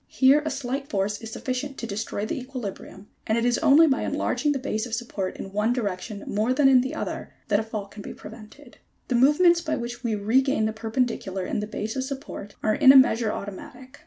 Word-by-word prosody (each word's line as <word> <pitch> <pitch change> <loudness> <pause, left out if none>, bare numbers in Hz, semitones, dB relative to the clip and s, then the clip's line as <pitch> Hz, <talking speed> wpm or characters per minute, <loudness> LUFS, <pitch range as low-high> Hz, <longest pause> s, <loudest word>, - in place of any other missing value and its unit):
Here 275 +3 +4
a 310 - -2
slight 270 0 -4
force 205 +2 -1
is 225 - -7
sufficient 265 +4 -4
to - - -5
destroy 210 -1 -3
the 215 - -3
equilibrium, 235 -6 -8 0.2
and 220 - +2
it 235 - +1
is 245 -1 +2
only 310 +1 +6
by 280 -2 +1
enlarging 295 - 0
the 285 - 0
base 245 -4 -3
of 230 - -2
support 210 -5 -4
in 195 - -8
one 210 +3 +1
direction 205 -3 -4
more 220 +5 0
than 290 -1 +4
in 255 -2 +6
another 260 - -5 0.2
that 205 -1 +3
a - - -1
fall 215 -2 -5
can 205 +1 -11
be - - -8
prevented. 225 +5 -13 0.3
The - - 0
movements 300 +8 +5
by 310 -2 -2
which 240 +1 -6
we 230 -3 0
regain 225 +3 +2
the 220 - -1
perpendicular 220 -4 -2
in - - -2
the 210 - -3
base 215 0 -4
of 260 - -1
support 265 -7 -7
are 215 - +2
in 265 +2 +7
a 270 - +8
measure 230 -4 +4
automatic. 245 +6 -9
235 Hz, 220 wpm, -25 LUFS, 210-265 Hz, 0.3 s, a